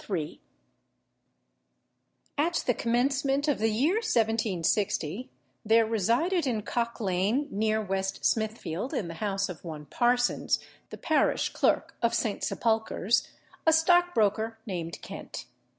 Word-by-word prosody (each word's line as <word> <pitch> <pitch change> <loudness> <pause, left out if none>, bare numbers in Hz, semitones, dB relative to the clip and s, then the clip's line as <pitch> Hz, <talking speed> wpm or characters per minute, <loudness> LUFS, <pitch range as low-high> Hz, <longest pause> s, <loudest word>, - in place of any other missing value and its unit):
] - - -17 2.3
At 335 +3 +1
the 245 - +3
commencement 270 +5 +1
of 290 - +1
the 220 +1 +2
year 280 - +2
1760, 220 - 0 0.3
there 225 +1 +4
resided 240 - +1
in 220 -4 -1
Cock 235 +1 -2
Lane, 205 +8 0
near 215 +1 +1
West 195 -2 -2
Smithfield, 220 - -1
in 185 -9 -2
the - - -5
house 195 -2 0
of 180 -4 -9
one 155 -3 -7
Parsons, 245 - +1 0.3
the - - -8
parish 315 - +1
clerk - - +1
of 235 0 +2
St. 220 -3 -1
Sepulchre's, 220 -1 +1 0.4
a - - +8
stockbroker, 310 - +3
named 170 -6 -5
Kent. - - -8
225 Hz, 120 wpm, -28 LUFS, 200-260 Hz, 2.3 s, a